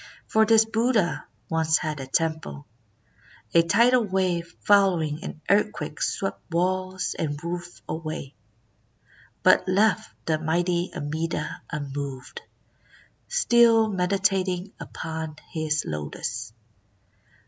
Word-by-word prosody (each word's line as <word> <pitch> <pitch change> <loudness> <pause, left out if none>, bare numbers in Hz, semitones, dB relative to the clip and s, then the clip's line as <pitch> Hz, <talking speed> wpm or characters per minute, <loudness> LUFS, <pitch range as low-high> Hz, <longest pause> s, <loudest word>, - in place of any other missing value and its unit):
" - - -29
For 220 0 +4
this 220 0 +6
Buddha 225 -4 +1 0.2
once 160 -1 +2
had 155 -3 -3
a 135 - -6
temple. 155 - -2 0.9
A 170 - +7
tidal 235 +9 +4
wave 185 -4 -1
follow 195 -4 +5
ing 155 0 -3
an 155 - -7
earthquake 200 -7 0
swept 195 - -2
walls 185 +2 -1
and 145 -2 -1
roof 175 +1 -6
away, 155 -3 -5 1.1
but - - +5
left 215 +3 +2
the 155 -1 +1
mighty 175 +3 0
Amida 150 +1 -3
unmoved, 140 -2 -5 0.9
still 235 - +4
meditating 190 0 0
upon 160 -1 -6 0.2
his 155 -1 0
lotus." 80 +9 -4
170 Hz, 105 wpm, -25 LUFS, 155-200 Hz, 1.1 s, A